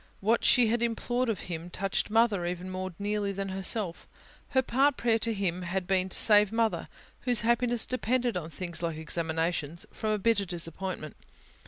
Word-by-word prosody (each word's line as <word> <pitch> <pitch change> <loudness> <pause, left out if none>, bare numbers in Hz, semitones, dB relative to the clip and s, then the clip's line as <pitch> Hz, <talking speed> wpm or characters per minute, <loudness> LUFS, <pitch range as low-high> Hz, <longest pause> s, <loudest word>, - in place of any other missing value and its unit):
What 225 +4 +2
she 245 - +5
had 235 +1 +1
implored 240 +1 0
of 215 - -2
Him 170 0 -6
touched 195 +3 -1
Mother 220 -4 +3
even 180 +1 -4
more 185 0 -4
nearly 205 0 -1
than 195 0 -4
herself: 190 -1 -1 0.4
her 260 -1 +2
part 270 +3 +2
prayer 230 -1 +2
to 230 +1 0
Him 185 -4 -1
had 180 +1 -2
been 190 0 +1
to - - 0
save 210 -2 +6
Mother 225 -1 0 0.3
whose 245 -3 +1
happiness 235 0 +2
depended 250 -2 0
on 165 -3 -4
things 170 0 -5
like 165 -2 -2
examinations 160 0 -2
from 220 - -3
a 215 - +2
bitter 205 -1 +2
disappointment. 175 -2 -4
200 Hz, 175 wpm, -29 LUFS, 175-230 Hz, 0.4 s, save